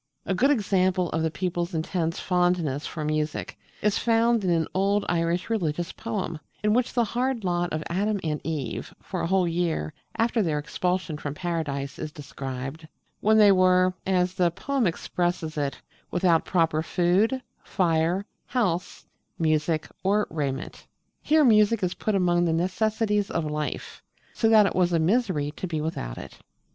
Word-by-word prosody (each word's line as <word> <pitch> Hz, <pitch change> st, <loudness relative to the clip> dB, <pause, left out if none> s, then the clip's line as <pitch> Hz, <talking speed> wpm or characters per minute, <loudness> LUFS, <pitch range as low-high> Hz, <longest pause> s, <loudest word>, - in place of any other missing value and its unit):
A 195 Hz, -, 0 dB
good 255 Hz, +9 st, +3 dB
example 185 Hz, -, +2 dB
of 160 Hz, -, 0 dB
the 160 Hz, -, +1 dB
people's 175 Hz, +1 st, -3 dB
intense 165 Hz, +1 st, -1 dB
fondness 175 Hz, -5 st, +1 dB
for 155 Hz, -3 st, -5 dB
music 155 Hz, 0 st, -2 dB, 0.3 s
is 210 Hz, -1 st, +2 dB
found 230 Hz, -1 st, +3 dB
in 185 Hz, -, +1 dB
an 165 Hz, -2 st, +2 dB
old 200 Hz, +2 st, +1 dB
Irish 170 Hz, +1 st, 0 dB
religious 175 Hz, -6 st, -1 dB
poem, 195 Hz, -8 st, -4 dB, 0.2 s
in 210 Hz, 0 st, +3 dB
which 245 Hz, +1 st, +1 dB
the 240 Hz, -, +3 dB
hard 245 Hz, +1 st, -1 dB
lot 175 Hz, -1 st, 0 dB
of 155 Hz, 0 st, -2 dB
Adam 200 Hz, +4 st, 0 dB
and 155 Hz, -2 st, -2 dB
Eve 145 Hz, -6 st, -4 dB
for -, -, -5 dB
a -, -, -1 dB
whole 185 Hz, 0 st, +2 dB
year 165 Hz, -, -1 dB, 0.2 s
after 230 Hz, 0 st, +2 dB
their 160 Hz, -6 st, 0 dB
expulsion 180 Hz, +1 st, -2 dB
from 145 Hz, -2 st, -5 dB
Paradise 155 Hz, -6 st, -3 dB
is 155 Hz, -1 st, -4 dB
described, 140 Hz, +1 st, -7 dB, 0.3 s
when 220 Hz, +1 st, +4 dB
they 210 Hz, -2 st, +7 dB
were 185 Hz, -1 st, +4 dB
as 180 Hz, -1 st, +2 dB
the 180 Hz, -2 st, +2 dB
poem 260 Hz, +6 st, -1 dB
expresses 175 Hz, -1 st, -2 dB
it 145 Hz, -2 st, -2 dB, 0.3 s
"without 175 Hz, -2 st, +2 dB
proper 165 Hz, -3 st, +2 dB
food, 185 Hz, +10 st, +2 dB, 0.2 s
fire, 175 Hz, +1 st, +1 dB, 0.2 s
house, 185 Hz, -9 st, -1 dB, 0.3 s
music, 155 Hz, 0 st, +1 dB
or 205 Hz, +2 st, +2 dB
raiment." 140 Hz, -4 st, -4 dB, 0.3 s
Here 310 Hz, -1 st, +4 dB
music 215 Hz, -2 st, +4 dB
is 180 Hz, -, +1 dB
put 215 Hz, -, -1 dB
among 175 Hz, -2 st, +3 dB
the 165 Hz, -, +1 dB
necessaries 210 Hz, +4 st, 0 dB
of 165 Hz, -1 st, -1 dB
life, 150 Hz, 0 st, -4 dB, 0.3 s
so 225 Hz, -, +2 dB
that 215 Hz, -2 st, +7 dB
it 195 Hz, -, 0 dB
was 180 Hz, -1 st, +2 dB
a 165 Hz, -, +3 dB
misery 170 Hz, -5 st, +1 dB
to 185 Hz, -, -3 dB
be 160 Hz, -3 st, -2 dB
without 150 Hz, -, -4 dB
it. -, -, -10 dB
175 Hz, 165 wpm, -26 LUFS, 160-200 Hz, 0.3 s, they